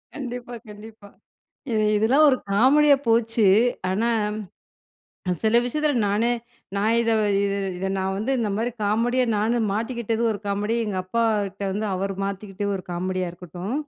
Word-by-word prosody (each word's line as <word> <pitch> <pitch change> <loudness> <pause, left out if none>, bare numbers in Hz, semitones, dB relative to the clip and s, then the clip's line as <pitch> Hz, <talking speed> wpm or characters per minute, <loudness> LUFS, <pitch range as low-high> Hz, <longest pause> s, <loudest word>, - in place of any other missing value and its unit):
கண்டிப்பா, 245 -3 -6 0.2
கண்டிப்பா. 210 0 -12 0.6
இ - - 0 0.2
இதெல்லாம் 265 +9 +4
ஒரு 260 - +4 0.2
காமெடியா 280 +6 +5
போச்சு. 225 -2 +3 0.4
ஆனா 225 +5 +1 1.2
அ - - +2
சில 220 +2 +4
விஷயத்துல 300 +2 0
நானே 220 +4 +1 0.5
நான் 220 +3 +2
இத 230 -1 +1 0.3
இது 200 0 0 0.2
இத 190 +1 -2
நான் 190 0 -1
வந்து 230 +6 -1
இந்தமாரி 225 +2 -1
காமெடி 230 +5 +1 0.2
நான் 220 +3 +1 0.2
மாட்டிக்கிட்டது 230 0 -2
ஒரு 205 - -4
காமெடி. 205 +3 -1
எங்க 200 -3 -3
அப்பா 230 +5 -1 0.2
கிட்ட 195 +1 -13
வந்து 210 +2 -2
அவரு 195 +1 -3
மாத்திக்கிட்டு 200 0 -4
ஒரு 185 - -11
காமெடியா 185 0 -2
இருக்கட்டும். 180 +5 -7
215 Hz, 145 wpm, -24 LUFS, 200-235 Hz, 1.2 s, காமெடியா